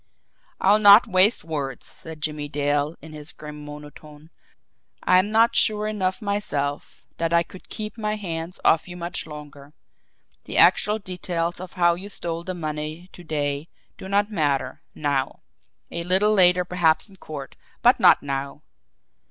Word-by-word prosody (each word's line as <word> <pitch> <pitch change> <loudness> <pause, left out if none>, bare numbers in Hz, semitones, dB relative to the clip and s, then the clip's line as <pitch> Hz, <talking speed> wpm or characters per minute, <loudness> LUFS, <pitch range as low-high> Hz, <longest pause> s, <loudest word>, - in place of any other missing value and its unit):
"I'll 205 +3 +4
not 205 +3 +8
waste 200 +1 +3
words," 145 -6 -5
said 160 -1 -12
Jimmie 150 -1 -3
Dale, 145 +2 0
in 160 -1 -11
his 150 0 -9
grim 150 -1 -10
monotone. 150 +1 -12 0.7
"I'm 185 +3 +4
not 225 +2 +3
sure 210 -1 +3
enough 205 0 -2
myself 145 -9 -3
that 165 0 -1
I 170 0 +4
could 180 +2 -15
keep 215 +1 -6
my 210 0 -1
hands 170 -3 -6
off 160 +2 +3
you 175 0 -9
much 170 -1 -3
longer. 145 -1 -11 0.7
The - - -4
actual 210 +1 +5
details 180 -3 -4
of 185 0 -9
how 175 -1 +3
you 190 +4 -7
stole 170 -4 -4
the 185 +1 -5
money 155 +2 -5
to 175 - -12
day 145 -1 -3 0.3
do - - -10
not 205 +2 +1
matter 145 -8 -1
NOW. 140 -3 -2 0.5
A 170 - -3
little 190 +5 +3
later 180 -2 +5
perhaps 165 -2 +1
in 195 -2 -18
court 145 -5 -8 0.3
but 245 +1 +5
not - - +6
now. 140 +1 -4
170 Hz, 155 wpm, -23 LUFS, 150-190 Hz, 0.7 s, not